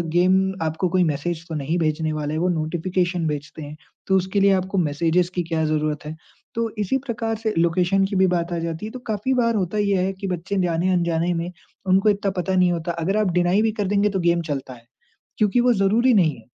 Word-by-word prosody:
Game 185 +2 +4 0.3
आपको 160 +3 -1
कोई 185 0 +2
message 160 +2 -2
तो 160 - -5
नहीं 150 +4 -1
भेजने 155 0 0
वाले 150 0 -3
वो 180 +2 +1
नोटिफ़िकेशन 175 +1 -1
भेजते 150 +1 -5
हैं, 145 +1 -8 0.3
तो 190 - +3
उसके 190 +2 0
लिए 200 0 +5
आपको 190 +1 -1
मैसेजेज़ 170 +3 +1
की 175 - 0
क्या 160 -1 -1
ज़रूरत 155 -1 -1
है। 155 +1 -6 0.4
तो 230 -1 0
इसी 210 +6 +1
प्रकार 225 -2 -2
से 220 -1 -2
लोकेशन 180 +3 +2
की 195 - -4
भी 190 0 +4
बात 175 -1 -1
आ - - -1
जाती 165 +3 -4
है 220 - -6
तो 255 - -7
काफ़ी 220 +5 -1
बार 230 -2 +2
होता 195 +1 -1
ये 200 -2 +2
है 195 - -2
कि 195 +1 -6
बच्चे 185 +2 -3
जाने-अनजाने 170 0 +1
में 170 +1 -3 0.4
उनको 195 +3 +4
इतना 200 -1 0
पता 185 +1 0
नहीं 180 -1 +4
होता। 170 0 -2
अगर 195 +5 0
आप 205 -4 +1
डिनाई 180 +3 +2
भी 220 -1 +2
कर 200 - 0
देंगे 205 +1 +2
तो 190 -1 -2
गेम 170 0 +2
चलता 135 -2 -4
है, 115 -1 -16 0.5
क्योंकि 215 +3 +3
वो 245 0 +4
ज़रूरी 220 +6 +3
नहीं 165 -7 +3
है। 110 -1 -17
180 Hz, 225 wpm, -22 LUFS, 165-195 Hz, 0.5 s, लिए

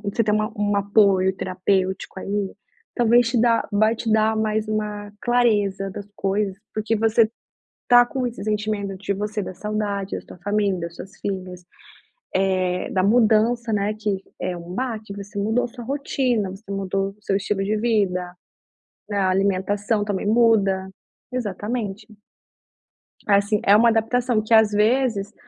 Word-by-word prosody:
um - - 0
você 230 +2 0
tenha 215 0 +1
um 205 0 0
apoio 195 -2 +3
terapêutico 185 +1 -1
aí, 200 0 -3 0.4
talvez 240 0 +4
te 235 - +1
dá 230 0 +2
vai 215 +2 +3
te 225 -1 -3
dar 220 0 +3
mais 220 0 0
uma 210 -1 -3
clareza 205 -6 +1
das 200 +2 -8
coisas, 195 0 -1 0.2
porque 215 +1 -1
você 225 0 +3 0.5
está 245 0 +7
com 255 0 -3
esses 235 -3 -6
sentimentos 210 -2 -2
de 200 0 -2
você, 210 +1 -3
da 185 - -6
saudade 205 -1 -3
da - - -5
sua - - -14
família, 205 -2 0
das 170 0 -6
suas 195 +1 -10
filhas, 185 -2 -5 0.7
eh, 185 -1 0
da 185 - +1
mudança, 230 +1 +3
né, 205 0 0
que 210 -2 -1 0.2
é 180 - -2
um 175 +1 -8
baque, 220 -5 -4
você 200 0 -7
mudou 220 +5 +1
a 245 - -3
sua 240 -1 -10
rotina, 255 -6 -1
você 195 +2 -11
mudou 195 0 -1
o 210 +1 -22
seu 195 - 0
estilo 200 0 -1
de 210 +2 0
vida, 195 -6 0 0.8
a 200 -2 +1
alimentação 200 +2 0
também 205 -1 -2
muda, 210 -4 +3 0.4
exatamente. 210 -2 -3 1.2
Assim, 205 +1 +3
é 200 - +7
uma 230 +2 +6
adaptação 230 +1 +1
que, 220 - 0
às 220 -1 +6
vezes, 215 -1 +1
210 Hz, 155 wpm, -22 LUFS, 195-225 Hz, 1.2 s, está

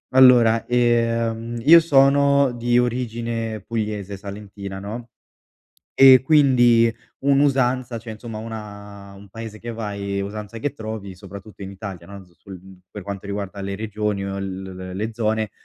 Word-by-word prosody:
Allora, 120 -3 +6
ehm, 115 -1 0
io 165 +5 +9
sono 140 -2 +4
di 120 0 +1
origine 115 -2 -2
pugliese, 105 -3 -4
salentina, 100 -1 -8
no, 115 +5 -7 0.8
e 130 -1 +8
quindi 120 -6 +4 0.3
un'usanza, 130 -3 +1
cioè, 110 0 -8
insomma 110 0 -8
una 100 -3 -9
un 100 +1 -14
paese 110 +1 -9
che 120 +2 -7
vai, 100 -3 -4
usanza 105 +2 -6
che 145 +5 -2
trovi, 110 -6 -7
soprattutto 100 +2 -11
in 95 - -6
Italia, 95 -3 -8
no, 100 -1 -11
z 90 - -25
sul, 95 -2 -11
mhmm, 95 -1 -15
per 105 - -7
quanto 100 0 -7
riguarda 100 0 -5
le 100 0 -4
regioni 105 -1 -3
o 100 0 -4
l 95 -1 -5
l 95 -1 -8
le 110 +4 -3
zone, 110 -1 -1
110 Hz, 150 wpm, -22 LUFS, 100-120 Hz, 0.8 s, io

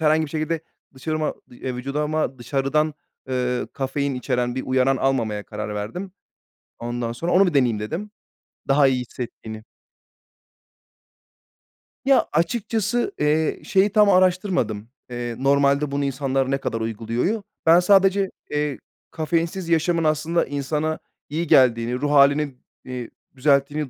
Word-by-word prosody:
herhangi 155 0 +3
bir 145 - -8
şekilde 155 +1 -2 0.3
dışarıma 155 +4 -2 0.2
eee, 125 +1 -5
vücuduma 140 +1 -2
dışarıdan, 140 +4 0 0.3
eee, 125 -1 -1
kafein 140 0 -2
içeren 125 -1 -1
bir 130 - -3
uyaran 130 +1 +2
almamaya 115 -6 0
karar 105 0 -6
verdim. 145 - -5 0.7
Ondan 120 0 -3
sonra 165 +9 -3
onu 195 +1 +5
bir 175 - -1
deneyeyim 120 -6 +2
dedim 165 - -5 0.6
daha 140 +1 +5
iyi 130 -1 +1
hissettiğini. 115 -3 -7 2.4
Ya, 270 -1 +4
açıkçası, 220 +6 0
eee, 150 +1 +1
şeyi 195 +2 +3
tam 210 -1 +5
araştırmadım, 180 - +1 0.2
eee, 120 -1 -4
"Normalde 140 +1 +2
bunu 140 0 -1
insanlar 135 -1 -1
ne 135 - +2
kadar 115 -4 -3
uyguluyor?" 115 - -1
u. - - -17 0.2
Ben 165 +1 +7
sadece, 195 +1 +4 0.2
eee, 150 -2 -1 0.3
kafeinsiz 165 +2 -2
yaşamın 165 +1 +2
aslında 155 +2 +1
insana 150 +3 -2 0.3
iyi 165 +4 -2
geldiğini, 120 -3 +4
ruh 145 +3 -1
hâlini, 140 0 +4 0.3
eee, 125 -2 -6 0.3
düzelttiğini 140 +2 +1
140 Hz, 130 wpm, -23 LUFS, 125-165 Hz, 2.4 s, Ben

